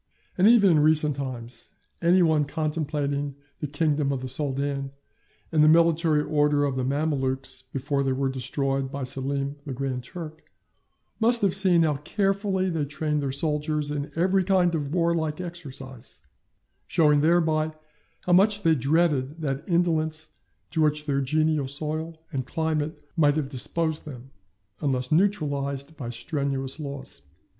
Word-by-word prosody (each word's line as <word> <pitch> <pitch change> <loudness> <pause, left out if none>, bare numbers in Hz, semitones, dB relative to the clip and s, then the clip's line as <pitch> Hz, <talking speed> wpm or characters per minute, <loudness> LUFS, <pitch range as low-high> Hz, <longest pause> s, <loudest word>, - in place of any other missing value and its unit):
And 190 +2 +4
even 215 -5 +6
in 155 - +4
recent 150 -1 +3
times, 120 -4 -6 0.3
any 175 +2 +5
one 155 -3 +3
contemplating 145 -2 -2 0.2
the 150 - -3
kingdom 145 -1 0
of 135 -2 -2
the - - -3
Soldan, 140 0 -2 0.6
and 155 -2 +4
the 155 - +7
military 165 -2 +4
order 150 -1 +2
of 140 -2 -1
the 130 - -1
Mamelukes 135 -2 -1
before 140 +1 -1
they 135 -1 +1
were 135 +1 0
destroyed 135 +1 -1
by 140 -1 -4
Selim 140 +2 -3
the 140 - -5
Grand 130 -1 -3
Turk, 160 +2 -9 0.7
must 235 0 +3
have 195 -3 +3
seen 180 -4 +4
how 150 -3 +1
carefully 195 +4 0
they 165 -5 -1
trained 150 +1 -2
their 140 -2 -2
soldiers 150 +1 -1
in 145 0 -3
every 185 +3 +2
kind 180 -2 +3
of 145 -3 -2
warlike 165 -2 0
exercise; 135 -8 -8 0.7
showing 150 -4 +4
thereby 160 -1 +2 0.5
how 180 - 0
much 205 +2 +4
they 165 - +5
dreaded 150 +1 +1
that 140 +3 -3
indolence 160 -2 +1 0.4
to 160 - 0
which 150 0 +1
their 140 -2 0
genial 155 +1 +1
soil 155 +3 -4
and 130 -4 -3
climate 155 -1 -1 0.2
might 145 -3 +4
have 150 -4 -1
disposed 160 +5 -1
them, 135 -3 -10 0.5
unless 130 -4 -1
neutralized 145 -5 0
by 125 -6 -6
strenuous 135 +2 -3
laws. 140 - -7
150 Hz, 150 wpm, -26 LUFS, 140-165 Hz, 0.7 s, the